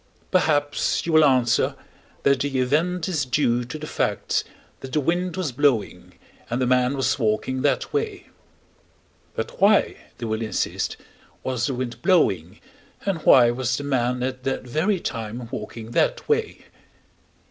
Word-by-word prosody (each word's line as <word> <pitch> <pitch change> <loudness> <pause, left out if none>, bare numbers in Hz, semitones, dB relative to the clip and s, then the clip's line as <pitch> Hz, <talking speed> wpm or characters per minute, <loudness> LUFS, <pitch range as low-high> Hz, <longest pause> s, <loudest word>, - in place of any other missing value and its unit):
Perhaps 145 -5 +1
you 170 - -1
will 155 0 +7
answer 130 -5 +3 0.5
that 140 -1 +3
the 140 -1 -1
event 160 +7 +1
is 160 -6 0
due 125 -2 +1
to 120 +5 -7
the 155 - -7
facts - - -1 0.4
that 130 - -9
the 155 - +3
wind 175 +4 -1
was 175 -7 -1
blowing, 125 -3 0 0.3
and 120 +1 -1
the 130 - +1
man 125 +2 +2
was 135 +1 0
walking 120 +3 0
that 145 - 0
way. 430 -2 -2 1.1
"But - - -5
why," 205 +1 +4 0.2
they 120 - -5
will 110 0 -2
insist, 110 - -2 0.5
"was 125 -3 -1
the 135 - -2
wind 120 -1 -5
blowing, 100 - +2 0.5
and 195 -4 0
why 120 -5 +6
was 125 +1 -1
the 145 - -5
man 125 -3 0
at 130 0 -3
that 135 0 -2
very 160 - 0
time 115 -3 -5
walking 110 +1 -7
that - - +1
way?" 445 -1 -1
130 Hz, 155 wpm, -23 LUFS, 120-160 Hz, 1.1 s, will